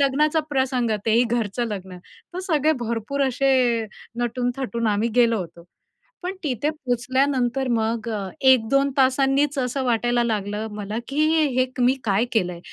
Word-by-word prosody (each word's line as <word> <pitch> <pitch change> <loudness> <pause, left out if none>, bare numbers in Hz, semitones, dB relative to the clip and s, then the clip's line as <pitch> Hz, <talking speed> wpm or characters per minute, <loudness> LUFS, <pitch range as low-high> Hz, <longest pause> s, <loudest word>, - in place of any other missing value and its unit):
लग्नाचा 295 +3 +2
प्रसंग, 260 -4 0 0.2
तेही 225 +2 +4
घरचं 235 -1 -1
लग्न, 190 -3 -7 0.4
तर - - -4
सगळे 310 -2 +2
भरपूर 235 +4 -2
असे 270 +1 +1 0.7
नटून-थटून 245 0 -2
आम्ही 210 +2 +1
गेलो 230 -2 +4
होतो. 170 -2 -8 0.6
पण 365 +2 -3
तिथे 285 0 -1
पोचल्यानंतर 260 -1 0
मग 230 0 -1
अ, 205 -4 -3
1-2 265 +1 +4
तासांनीच 270 +2 +2
असं 260 +1 -1
वाटायला 240 0 +1
लागलं 210 -1 -2
मला 210 +1 -4
की 300 +2 +1
हे 320 0 +3
हे 255 0 +3
क 255 - -2
मी 255 +2 +4
काय 205 +2 +1
केलंय 180 -6 0
245 Hz, 145 wpm, -23 LUFS, 220-270 Hz, 0.7 s, तेही